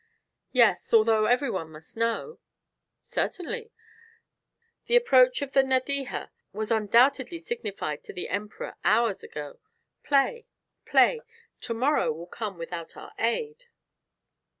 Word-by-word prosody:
"Yes. 240 -4 +3
Although 220 -1 +4
every 250 +1 +2
one 165 -4 -4
must 155 +1 -14
know." 230 - -2 0.6
"Certainly. 455 +5 -3 1.2
The 475 - +2
approach - - +5
of 275 - -6
the 270 - +5
Nadeja 265 0 -1 0.2
was 215 +2 -4
undoubtedly 240 - +3
signified 265 - -5
to - - -9
the 180 - -5
Emperor 210 +2 -4
hours 230 -4 +2
ago. 145 -1 -8 0.4
Play, 290 - +1 0.4
play; 475 -2 +4 0.4
to 230 - -4
morrow 270 - +2
will 165 +3 -7
come 200 +1 -6
without 170 0 -7
our - - -11
aid." 445 - -2
240 Hz, 120 wpm, -27 LUFS, 210-330 Hz, 1.2 s, approach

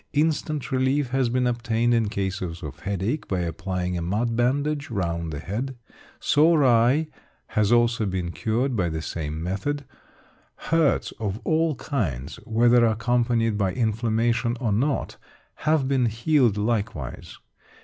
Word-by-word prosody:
Instant 150 -1 0
relief 130 +1 +1
has 130 -2 +1
been 125 +1 +1
obtained 120 -1 +1
in 115 -3 +2
cases 95 -4 -3
of 75 -4 -7
headache 100 - -2
by 95 -2 -1
applying 90 +2 -3
a 85 - -2
mud 110 +7 -1
bandage 140 +5 0
round 85 -6 -2
the 75 - -4
head. 115 - -4 0.4
Sore 155 0 +4
eye 125 +5 +4 0.4
has 105 0 +1
also 120 -2 +3
been 90 -2 -2
cured 120 +6 -1
by 90 -5 +1
the 80 0 -4
same 80 -1 -4
method; 130 +11 -2 0.7
hurts 160 -5 +1
of 105 -1 -3
all 160 -1 +1
kinds, 80 - -3
whether 120 +2 +4
accompanied 115 -1 +1
by 95 -2 +1
inflammation 115 +1 0
or 115 -5 0
not, 135 +8 0 0.4
have 155 -3 +1
been 130 -3 +2
healed 120 0 +2
likewise. 105 - -3
115 Hz, 140 wpm, -25 LUFS, 100-130 Hz, 0.7 s, Sore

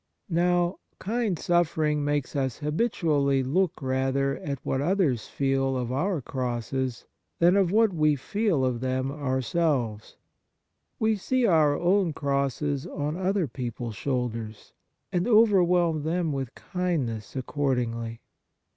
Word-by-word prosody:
Now, 175 +1 +2 0.2
kind 220 -3 -1
suffering 155 -4 +1
makes 145 -1 -1
us 130 -3 -1
habitually 150 - +1
look 180 +7 0
rather 135 +1 0
at 140 -1 -4
what 135 - 0
io6 - - -1
Kindness - - +3
others 135 - +1
feel 135 -1 0
of 125 -1 -3
our 165 +5 0
crosses 125 0 -3 0.3
than 175 +2 +4
of 195 -3 +3
what 220 -1 +4
we 155 -2 +3
feel 165 - 0
of 125 -2 -1
them 130 +1 -1
ourselves. 130 -4 -1 0.8
We 220 -1 +1
see 255 +5 +1
our 155 -7 +4
own 180 -1 +2
crosses 140 +1 -1
on 150 -2 -3
other 190 0 0
people's 120 -2 -5
shoulders, 115 -5 -3 0.4
and 180 +3 0
overwhelm 180 -8 +4
them 165 +1 -1
with 135 -3 -4
kindness 145 -13 -3
accordingly. 120 -4 -2
145 Hz, 130 wpm, -26 LUFS, 130-175 Hz, 0.8 s, than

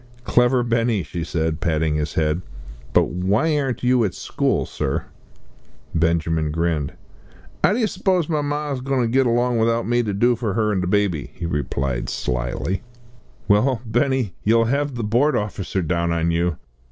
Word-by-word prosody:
"Clever 125 +1 +3
Benny," 115 -4 +1
she 85 +2 -5
said, 80 -1 -1
patting 80 -2 +1
his 75 -1 -2
head; 80 +2 +1 0.5
"but - - +3
why 100 - +1
aren't 135 -3 -2
you 125 -1 +3
at 100 - -1
school, - - 0
sir?" - - -2 0.9
Benjamin 80 -1 +1
grinned. 80 -2 -1 0.7
"'Ow - - +5
d'yer 230 +1 +1
s'pose 185 -5 0
my 155 -3 0
ma's 145 -2 -2
goin' 135 0 0
to - - +1
git 130 +2 +3
along 120 0 +2
without 115 +1 +1
me 120 +1 +2
to 110 -3 -2
do 120 +5 +3
for 115 -4 -2
'er 105 -1 +2
and 95 -3 0
the 90 - -2
babby?" 95 -6 0
he 85 - -5
replied 70 -5 -2
slily. 60 +9 -2 0.7
"Well, 115 +4 +3
Benny, 120 -1 0
you'll 115 +2 +4
have 140 +3 0
the 120 - -3
Board 120 +8 +2
officer 100 -2 -2
down 85 +1 0
on 85 0 +1
you." 85 -1 0
105 Hz, 165 wpm, -22 LUFS, 85-125 Hz, 0.9 s, Ow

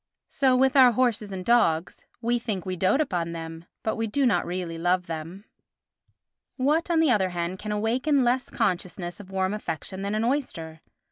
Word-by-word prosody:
So 265 -2 +3
with 265 +1 +3
our 255 -3 +7
horses 225 -4 +1
and 185 -1 -5
dogs: 180 -9 +2 0.2
we 240 +1 +1
think 210 -7 -4
we 185 -1 -2
dote 185 - +2
upon 170 - -2
them, 165 0 -7 0.2
but 220 - -1
we 225 0 -1
do 270 +6 +1
not 235 - +2
really 175 -2 -4
love 180 +1 +1
them. 165 +5 -7 1.1
What, 300 +6 +1
on 335 -2 +3
the 315 -5 +4
other 195 -5 +2
hand, 175 +1 -3
can 215 - -5
awaken 250 +7 +1
less 250 +1 +1
consciousness 180 -4 -2
of 200 -2 -11
warm 190 0 -1
affection 190 -1 -5
than 200 +2 -2
an 215 - 0
oyster? 170 - -2
205 Hz, 185 wpm, -26 LUFS, 175-245 Hz, 1.1 s, our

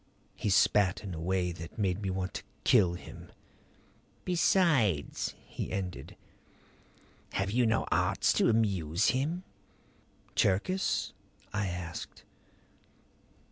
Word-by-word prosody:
He - - -2
spat 100 0 +3
in 95 -3 -5
a 80 - -5
way 90 +1 0
that 85 -1 -9
made 100 -2 0
me 100 - -2
want 95 0 -3
to - - -5 0.2
kill 95 -8 +4
him. - - -11 0.9
"Besides," 160 - +2
he - - -5
ended, 90 -7 -5 1.2
"have 95 +1 -1
you 120 +1 +3
no 110 - +1
arts - - +2
to - - +3
amuse 100 -6 +2
him?" 155 +8 -1 0.9
"Cherkis?" 145 - +1 0.4
I 105 -1 0
asked. 90 -2 -6
95 Hz, 110 wpm, -30 LUFS, 90-115 Hz, 1.2 s, kill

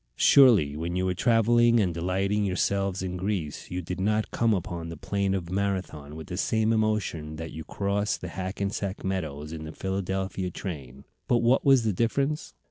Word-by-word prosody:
Surely 110 - +6
when 85 +3 -3
you 90 0 0
were 90 - +1
travelling 120 +3 +4
and 95 -5 +1
delighting 95 +5 0
yourselves 95 0 0
in 90 -1 -3
Greece 90 -5 -3
you 90 0 -4
did 90 +2 -5
not 105 +2 0
come 115 -1 +2
upon 85 -4 -2
the 85 - -7
plain 95 +2 -1
of 90 -2 -4
Marathon 95 -7 -2
with 80 0 -7
the 90 - -6
same 110 +2 +1
emotion 105 -8 -1
that 80 +1 -6
you 80 - -7
cross 100 +3 -1
the 90 - -7
Hackensack 95 +1 -3
meadows 80 -5 -3
in 80 -1 -6
the 80 - -7
Philadelphia 95 0 -3
train. 70 -8 -7 0.2
But 120 -1 +2
what 125 +3 +4
was 135 -3 +5
the 110 -2 +1
difference? 135 - -1
95 Hz, 180 wpm, -27 LUFS, 85-105 Hz, 0.2 s, Surely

